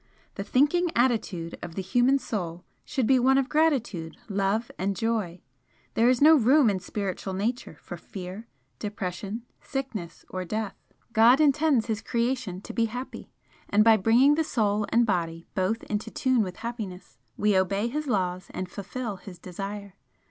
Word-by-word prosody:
The 195 - -4
thinking 295 - +2
attitude 215 -9 0
of 170 -1 -7
the 195 - -2
human 245 +8 +3
Soul 180 -9 -4 0.2
should 265 -5 -1
be 260 +2 +4
one 265 +2 +4
of 270 -1 +2
gratitude, 245 - 0
love 200 +3 0
and 195 +2 0
joy. 215 -7 -1 0.5
There 235 +2 +4
is 255 +2 +3
no 315 +2 +9
room 265 -2 +5
in 190 - -2
Spiritual 190 0 -4
Nature 215 -4 -3
for 175 - -8
fear, 190 +5 -8 0.3
depression, 205 +1 -4 0.2
sickness 240 - -5
or 185 0 -4
death. 215 +2 -3 0.4
God 235 +5 +6
intends 295 -4 +3
His 220 -2 -2
creation 235 -5 -1
to - - -8
be 230 - +2
happy, 245 +4 -6 0.4
and 210 +1 +5
by 225 0 +7
bringing 230 +8 +5
the 320 +2 +2
Soul 210 -7 0
and 235 +1 +4
Body 170 -5 -1
both 205 +3 0
into 215 +1 -3
tune 255 0 +1
with 185 -3 -3
happiness 195 - -7 0.2
we 210 -1 +2
obey 195 +3 +1
His 300 +5 -3
laws 185 -5 -1
and 185 -1 -4
fulfil 210 +1 -5
His 185 -1 -11
desire. 195 +3 -7
215 Hz, 165 wpm, -27 LUFS, 190-245 Hz, 0.5 s, no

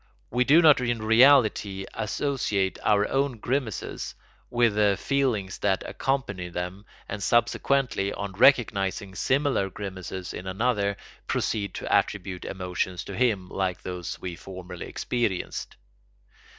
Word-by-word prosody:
We 125 +1 +2
do 160 +6 +6
not 150 -5 +7
in 120 -2 0
reality 110 -5 +4
associate 105 -5 -1
our 105 -1 +3
own 135 -2 0
grimaces 125 -1 -3 0.3
with 120 -2 +3
the 105 -2 +3
feelings 125 -9 0
that 95 -2 +1
accompany 105 -10 -2
them 90 +3 -5 0.2
and 100 - -5
subsequently, 120 -1 +1
on 100 -1 -4
recognising 100 -4 +3
similar 130 -1 +1
grimaces 95 -2 -6
in 90 - -7
another, 100 0 0 0.3
proceed 100 -4 -1
to - - -3
attribute 95 -2 0
emotions 90 -1 -3
to 100 - -7
him 110 -6 +1
like 95 -1 -2
those 90 -2 -5
we 90 -2 -5
formerly 90 -1 -8
experienced. 110 -7 -2
100 Hz, 125 wpm, -26 LUFS, 95-125 Hz, 0.3 s, not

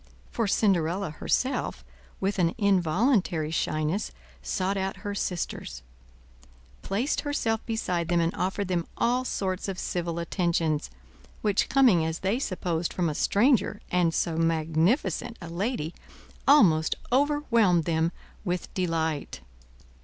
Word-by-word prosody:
For 230 -3 0
Cinderella, 190 -3 +1
herself, 255 - -1 0.3
with 195 +1 -1
an 170 -2 +2
involuntary 190 - +2
shyness, 155 +4 -1 0.3
sought 185 - -1
out 190 0 -2
her 205 - -2
sisters; 165 - -4 1.0
placed 225 +9 -1
herself 230 -7 -1
beside 180 -7 -1
them 175 0 +2
and 165 +1 +1
offered 190 +2 -2
them 175 -2 -1
all 250 +2 +2
sorts 190 -6 -2
of 195 -2 -4
civil 170 -2 -3
attentions, 170 - 0 0.5
which 205 -2 +2
coming 245 -12 +5
as 160 0 -3
they 200 +6 0
supposed 175 -7 -2
from 175 -3 0
a - - -2
stranger, 205 - +2
and 180 -2 +3
so 165 0 -1
magnificent 165 - +1
a 170 - -8
lady, 175 -2 -2 0.5
almost 170 - +5 0.2
overwhelmed 250 - +3
them 165 +1 +1 0.3
with 180 -3 -3
delight. 160 - -2
180 Hz, 125 wpm, -27 LUFS, 165-210 Hz, 1.0 s, coming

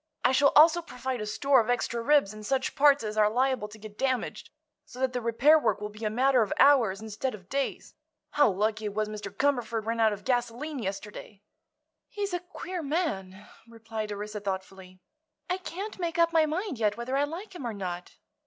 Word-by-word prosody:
I - - +4
shall 280 +2 +4
also 325 +3 +7
provide 255 -6 -5
a 210 - -4
store 275 +4 +3
of 220 - -5
extra 235 -1 0
ribs 275 -5 +3
and 215 0 -10
such 265 +4 -1
parts 285 -2 +4
as 215 0 -4
are 210 -1 +5
liable 255 -1 0
to 210 +1 -13
get 215 0 -12
damaged, 260 -2 -2 0.3
so - - -15
that 260 -1 0
the 250 - -2
repair 245 +7 +4
work 235 - 0
will 210 0 -5
be 210 +2 -11
a 215 - +1
matter 255 +3 +3
of 210 - -1
hours 235 -9 +5
instead 220 +3 -4
of 190 -2 -16
days. 275 0 -3 0.4
How 290 - +4
lucky 215 +3 -1
it 205 -1 -4
was 215 0 0
Mr. 210 -2 -6
Cumberford 235 -1 0
ran 230 +1 -2
out 220 -1 +4
of 205 -1 -6
gasoline 250 +4 -1
yesterday." 205 0 -7 0.7
"He's 405 -2 -4
a 355 - 0
queer 355 0 -6
man," 210 - -3 0.2
replied 225 -2 -6
Orissa, 210 +1 -5
thoughtfully. 190 -1 -6 0.5
"I 365 - +1
can't 380 +4 -6
make 340 -1 -2
up 335 -1 +3
my 320 -1 +4
mind 330 - -3
yet 210 -1 +1
whether 240 +3 -3
I 280 +1 +2
like 350 +8 -8
him 280 -9 -6
or 230 - -3
not." 180 -2 -6
235 Hz, 205 wpm, -28 LUFS, 210-285 Hz, 0.7 s, also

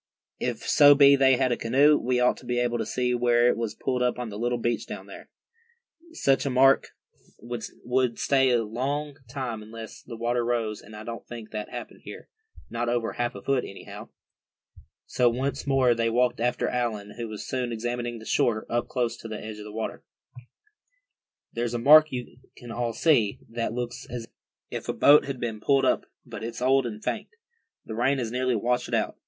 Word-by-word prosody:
"If - - -3
so 145 -1 +7
be 140 0 +7
they 135 -2 +4
had 130 -1 +1
a - - +2
canoe, 140 +7 +4
we 125 -2 0
ought 125 0 +3
to - - -14
be 120 0 -1
able 120 -1 0
to 110 - -2
see 125 +1 0
where 120 0 +3
it - - +2
was 115 -2 -3
pulled 125 -1 -2
up 125 0 +1
on 125 -2 -4
the 105 0 -7
little 120 +1 0
beach 120 -2 -2
down - - -8
here. - - -11 0.8
Such 135 - +2
a 140 - -1
mark 135 +1 +4 0.5
would 120 +1 -2
stay 135 -1 +3
a 120 -2 +2
long 140 +6 -3
time 125 -4 -4
unless 110 +1 -10
the 115 -2 -9
water 120 +1 0
rose, 115 -3 -1
and 110 +1 -13
I 105 - -8
don't 115 +1 -7
think 115 -2 -9
that 105 -1 -5
happened - - -8
here, - - -10 0.4
not 120 0 -2
over 120 -1 -1
half 120 -2 -2
a 100 - -9
foot, 135 -2 +1
anyhow." 100 - -10 1.0
So 125 -1 +2
once 130 +4 -3
more 135 -3 +4
they 115 0 0
walked 120 +1 +1
after 120 +1 0
Allan, 110 -4 -2
who 120 -1 -4
was 110 -1 -7
soon 125 -2 -2
examining 120 +1 -3
the 110 - -11
shore 110 -1 +1 0.2
close 120 -2 -1
to - - -9
the 110 -1 -6
edge 110 0 -8
of 105 - -8
the 105 - -8
water. 110 +1 -5 1.5
"There's 120 0 -2
a - - +1
mark 155 +6 +7
you 125 -1 -6 0.2
can 120 -1 -10
all 120 -1 -2
see, 115 -6 +2
that 115 -1 -3
looks 120 +1 -5
as 120 -1 -5 0.5
if - - -5
a - - +1
boat 145 +1 +6
had 140 -2 -5
been 115 -3 -3
pulled 135 +2 +3
up, - - +1 0.2
but - - -8
it's 115 0 -5
old 130 0 +3
and 110 -2 -8
faint. - - -2 0.6
The 110 - -6
rain 125 +5 +1
has 120 -4 -3
nearly 125 0 0
washed 120 +3 0
it - - -1
out. - - -1
120 Hz, 205 wpm, -26 LUFS, 115-130 Hz, 1.5 s, so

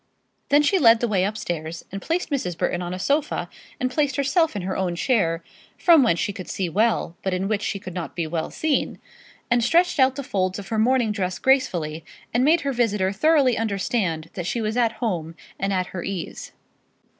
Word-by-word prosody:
Then 290 +1 +5
she 375 +6 +3
led 230 -5 +6
the 240 - 0
way 195 -4 +1
upstairs, 170 -6 -4
and 195 +1 -5
placed 335 0 -2
Mrs. 180 - -2
Burton 175 +1 -1
on 175 0 -4
a 185 - -4
sofa, 285 +10 0 0.3
and 255 -1 -1
placed 285 -1 0
herself 285 +2 +1
in 200 - -3
her 190 +1 -3
own 180 -2 -1
chair, 170 -7 +1 0.3
from 335 -4 +6
whence 200 -10 +2
she 205 - -1
could 185 -4 -8
see 185 -3 -2
well, 210 -2 +1
but 190 -1 -1
in 190 +1 -1
which 210 -1 0
she 205 - -2
could 185 -2 -8
not 175 -2 -5
be 170 - -1
well 160 0 -3
seen, 310 -2 -1 0.5
and 240 0 +3
stretched 340 +6 +3
out 260 0 +4
the 280 - -4
folds 185 -5 -1
of 200 -1 -8
her 220 - 0
morning 240 -1 +3
dress 185 -3 -2
gracefully, 170 - +1 0.3
and 240 +2 +2
made 320 +4 +4
her 280 -1 -1
visitor 210 -6 +1
thoroughly 265 +2 +3
understand 195 -6 -1
that 180 -2 -4
she 235 - -1
was 220 0 -2
at 235 -2 +2
home 170 -9 -3 0.2
and 195 0 -1
at 185 -1 0
her 175 - -4
ease. 190 -4 -5
210 Hz, 210 wpm, -23 LUFS, 180-260 Hz, 0.5 s, led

